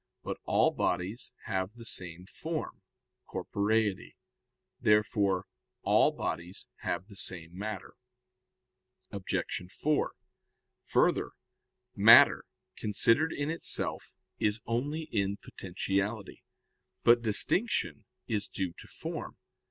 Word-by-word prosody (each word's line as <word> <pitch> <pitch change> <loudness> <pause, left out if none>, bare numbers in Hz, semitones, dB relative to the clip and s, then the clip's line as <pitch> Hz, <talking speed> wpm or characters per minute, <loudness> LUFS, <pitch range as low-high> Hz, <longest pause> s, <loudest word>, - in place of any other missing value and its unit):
But - - -4
all - - +3
bodies 95 +9 -1
have 95 +1 -2
the 115 -1 -11
same 90 -4 -3
form, 160 - -5 0.5
corporeity. 105 -1 -1 0.6
Therefore 105 -3 +2 0.4
all - - +4
bodies 85 +3 -4
have 90 +2 -3
the 100 -1 -14
same 90 -3 -3
matter. 105 0 -5 1.2
Obj. 95 -2 -3
4: 150 +6 0 0.7
Further, - - +2 0.7
matter, - - +8 0.3
considered 115 +9 +3
in 145 +2 -2
itself, 165 - 0 0.3
is 105 +1 +1
only 140 +8 -1
in 100 -1 0
potentiality. 100 +3 -3 0.6
But 120 0 +6
distinction 115 - +2 0.2
is 105 -3 -1
due 95 -3 -3
to - - -10
form. - - -6
105 Hz, 95 wpm, -30 LUFS, 95-115 Hz, 1.2 s, matter